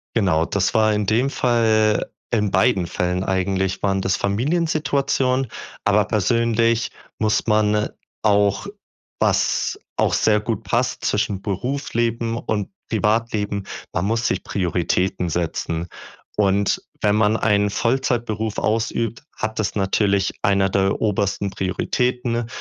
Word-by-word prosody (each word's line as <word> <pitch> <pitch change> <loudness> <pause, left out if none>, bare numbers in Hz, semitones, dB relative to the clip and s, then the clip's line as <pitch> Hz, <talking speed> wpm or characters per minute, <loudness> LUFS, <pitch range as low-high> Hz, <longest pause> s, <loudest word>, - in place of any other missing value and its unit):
Genau, 90 -7 +2
das 95 +1 0
war 110 -1 +4
in 105 0 0
dem 120 +6 +2
Fall 110 -4 +2 0.2
in 105 -3 +1
beiden 95 -1 +3
Fällen 90 +1 -1
eigentlich, 95 0 0
waren 95 -1 +1
das 95 0 +1
Familiensituationen. 135 - 0 0.4
Aber 105 0 +4
persönlich 115 +2 +1 0.3
muss 110 +1 +1
man 105 -1 +2 0.3
auch 100 - +2 0.5
was - - +1 0.2
auch - - +1
sehr 105 -1 +3
gut 110 +1 -3
passt 120 +5 -1
zwischen 105 -2 0
Berufsleben 115 +1 -1
und 105 -4 -2 0.2
Privatleben 105 -2 0 0.3
man 85 - 0
muss 115 +3 +1
sich 95 - -1
Prioritäten 90 -1 0
setzen. 85 0 -2 0.5
Und 100 -1 +2 0.2
wenn 105 0 +3
man 110 +1 +3
einen 105 -1 +2
Vollzeitberuf 115 -2 -1
ausübt, 115 +1 -1
hat 110 0 -3
das 105 - -1
natürlich 100 -1 +1
eine 100 -1 +2
der 95 0 +1
obersten 100 -1 0
Prioritäten. 120 +5 -1
105 Hz, 120 wpm, -21 LUFS, 100-115 Hz, 0.5 s, war